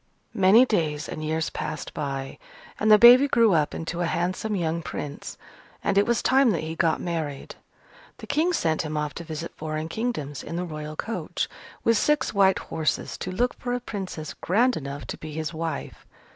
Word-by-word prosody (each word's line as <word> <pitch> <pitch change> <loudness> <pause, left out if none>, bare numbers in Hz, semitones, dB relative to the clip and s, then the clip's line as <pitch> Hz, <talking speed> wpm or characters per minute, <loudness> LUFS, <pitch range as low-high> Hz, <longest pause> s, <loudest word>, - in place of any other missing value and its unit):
Many 200 +6 +6
days 155 - -1
and 155 - -6
years 160 +1 -1
passed 150 - -5
by, 135 -2 -4 0.4
and 215 0 +3
the 210 - +10
baby 245 +5 +9
grew 230 -6 +4
up 155 -3 +1
into 165 +1 -4
a 175 - +1
handsome 185 +6 -1
young 170 -2 -1
Prince, 145 -2 -6 0.5
and 200 - +1
it 200 +1 +4
was 235 -1 +1
time 265 -1 +4
that 165 - -2
he 160 +1 -4
got 165 -1 +1
married. 160 -5 -4 0.6
The - - -9
King 320 +4 +1
sent 160 - +1
him 155 -1 -4
off 150 -1 -2
to 170 - -7
visit 160 +1 -6
foreign 155 0 -4
kingdoms, 165 - -3
in 165 - -6
the 180 +1 -2
Royal 155 -2 -6
coach, 225 +8 -3 0.4
with 230 -1 +3
six 300 0 +1
white 195 -2 +4
horses, 160 -1 -2
to 185 - -4
look 245 +7 0
for 245 0 -3
a 245 - 0
Princess 190 -9 -6
grand 240 +7 +2
enough 140 -1 -6
to - - -6
be 155 -1 -8
his 160 +1 -3
wife. 160 0 -5
170 Hz, 190 wpm, -25 LUFS, 155-220 Hz, 0.6 s, the